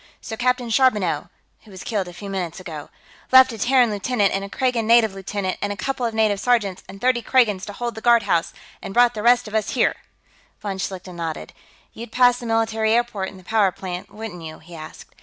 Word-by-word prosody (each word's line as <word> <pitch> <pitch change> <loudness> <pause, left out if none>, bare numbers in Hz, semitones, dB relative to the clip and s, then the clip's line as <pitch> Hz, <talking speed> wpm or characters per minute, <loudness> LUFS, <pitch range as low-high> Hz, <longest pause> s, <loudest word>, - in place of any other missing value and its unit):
So 225 - -6
Captain 250 0 0
Charbonneau, 210 - +2 0.3
who 220 - -18
was 190 -2 -10
killed 205 -5 -2
a 175 - -9
few 200 +4 -9
minutes 185 -3 -4
ago, 160 -5 -8 0.4
left 260 0 +8
a 225 - -8
Terran 245 0 +3
lieutenant 205 0 0
and 195 - -1
a 200 - -7
Kragan 245 -2 0
native 230 -3 +5
lieutenant 195 0 -4
and 205 - -1
a 205 - -5
couple 255 0 -2
of 225 - -5
native 215 -2 +2
sergeants 210 -6 +1
and 195 - -10
thirty 250 +1 +2
Kragans 220 -6 +2
to 205 - -6
hold 240 +2 -4
the 220 - -9
guardhouse, 215 -8 +3 0.3
and 195 - -7
brought 245 0 +5
the 215 - -5
rest 240 +1 +4
of 215 - -10
us 220 -1 0
here." - - +3 0.7
Von 195 -2 -5
Schlichten 185 -2 -5
nodded. 165 -2 -5 0.4
"You'd 230 0 -9
pass 245 0 +4
the 240 - -7
military 225 -1 +1
airport 230 -5 0
and 190 - -13
the - - -17
power 210 -1 +2
plant, 180 -1 -7
wouldn't 215 -5 -8
you?" 160 -1 -8
he 170 +2 -15
asked. 155 -1 -11
215 Hz, 215 wpm, -22 LUFS, 190-240 Hz, 0.7 s, left